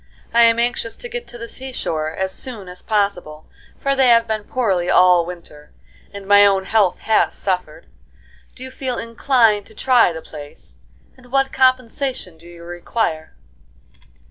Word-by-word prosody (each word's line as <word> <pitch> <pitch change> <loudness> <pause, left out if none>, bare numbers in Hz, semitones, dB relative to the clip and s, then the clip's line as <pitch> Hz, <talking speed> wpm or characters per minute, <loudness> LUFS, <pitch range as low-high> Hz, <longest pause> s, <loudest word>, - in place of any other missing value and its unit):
I 235 - +5
am 230 0 +4
anxious 235 -1 -1
to 485 - -9
get 485 0 -6
to 240 - -11
the 230 0 -7
sea 265 +2 -9
shore 155 -10 -3
as 190 +4 -3
soon 225 -7 -4
as 180 0 -11
possible, 190 -8 -2 0.3
for 275 0 0
they 265 -1 +3
have 230 -1 +5
been 215 -1 -3
poorly 195 -9 -1
all 180 -2 +5
winter, 170 -4 -11 0.4
and 200 -1 -10
my 205 0 +7
own 195 -1 +3
health 205 -3 +2
has 220 - +1
suffered. 185 -2 -3 0.7
Do 255 - -10
you 260 - -8
feel 260 -2 -4
inclined 230 -3 +1
to 220 - -17
try 245 -7 +3
the 160 -1 -8
place? 145 -2 -12 0.4
And 250 -1 -20
what 270 0 +1
compensation 255 - 0
do 170 - -15
you 170 -1 -13
require?" 175 - -3
215 Hz, 170 wpm, -19 LUFS, 180-250 Hz, 0.7 s, my